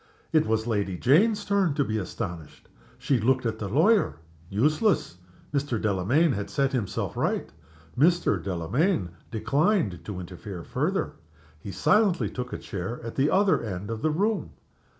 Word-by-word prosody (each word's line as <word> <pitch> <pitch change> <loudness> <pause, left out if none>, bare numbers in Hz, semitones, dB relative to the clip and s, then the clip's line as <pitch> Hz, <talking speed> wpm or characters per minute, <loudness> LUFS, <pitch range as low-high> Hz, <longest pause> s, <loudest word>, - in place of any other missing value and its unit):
It 155 -7 +4
was 110 0 +1
Lady 100 -5 -1
Jane's 205 - +3
turn 195 -7 +2
to 145 - +2
be 110 -4 -2
astonished. 85 -4 -6 0.3
She 130 0 +1
looked 130 +3 +2
at 110 -1 -2
the 105 - -3
lawyer. 165 - +3 0.3
Useless! 150 - +1 0.3
Mr. 140 -5 0
Delamayn 110 - +2
had 100 -4 -3
set 135 -2 +1
himself 115 -7 -2
right - - -1 0.4
Mr. 170 +7 +3
Delamayn 95 - 0 0.2
declined 140 - +1
to 100 -2 -5
interfere 90 0 -8
further. - - -2 0.4
He 100 - -7
silently 185 - +2
took 125 -1 -5
a - - -3
chair 100 +4 -5
at 115 - -5
the 140 +2 +2
other 195 0 +3
end 100 -1 -5
of 110 -1 -4
the 155 - +2
room. 200 +7 0
125 Hz, 150 wpm, -26 LUFS, 100-160 Hz, 0.4 s, It